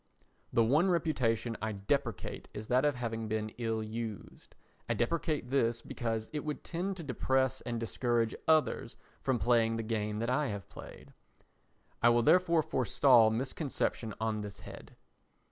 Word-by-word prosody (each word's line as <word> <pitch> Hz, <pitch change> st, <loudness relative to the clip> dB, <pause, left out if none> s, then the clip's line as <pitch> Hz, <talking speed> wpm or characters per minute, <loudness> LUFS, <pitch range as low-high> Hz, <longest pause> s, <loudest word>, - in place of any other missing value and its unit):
The 115 Hz, -, +4 dB
one 150 Hz, +11 st, +3 dB
reputation 125 Hz, -9 st, 0 dB
I 110 Hz, 0 st, -2 dB
deprecate 115 Hz, +1 st, -2 dB
is 110 Hz, +1 st, -7 dB
that 130 Hz, +3 st, +3 dB
of 145 Hz, -2 st, +2 dB
having 115 Hz, -2 st, -3 dB
been 110 Hz, 0 st, -2 dB
ill 115 Hz, -2 st, -1 dB
used. 110 Hz, -2 st, -7 dB, 0.3 s
I -, -, +1 dB
deprecate 150 Hz, 0 st, -1 dB
this 115 Hz, -4 st, +1 dB
because 115 Hz, -2 st, -3 dB
it 150 Hz, -, -2 dB
would 150 Hz, -1 st, -4 dB
tend 185 Hz, +3 st, -3 dB
to 170 Hz, -, -6 dB
depress 130 Hz, -1 st, 0 dB
and 120 Hz, -1 st, -3 dB
discourage 115 Hz, 0 st, 0 dB
others 160 Hz, -1 st, +2 dB, 0.3 s
from 130 Hz, -2 st, +1 dB
playing 115 Hz, -1 st, +2 dB
the 115 Hz, -, -2 dB
game 105 Hz, -1 st, -2 dB
that 115 Hz, +2 st, -1 dB
I 140 Hz, +3 st, +1 dB
have 100 Hz, -5 st, -5 dB
played. -, -, -12 dB, 0.9 s
I 120 Hz, -, +6 dB
will 120 Hz, 0 st, +4 dB
therefore 170 Hz, +2 st, +4 dB
forestall 125 Hz, -2 st, +4 dB
misconception 120 Hz, -2 st, -2 dB
on 110 Hz, -1 st, -1 dB
this 105 Hz, -1 st, -8 dB
head. -, -, -11 dB
120 Hz, 155 wpm, -32 LUFS, 110-140 Hz, 0.9 s, I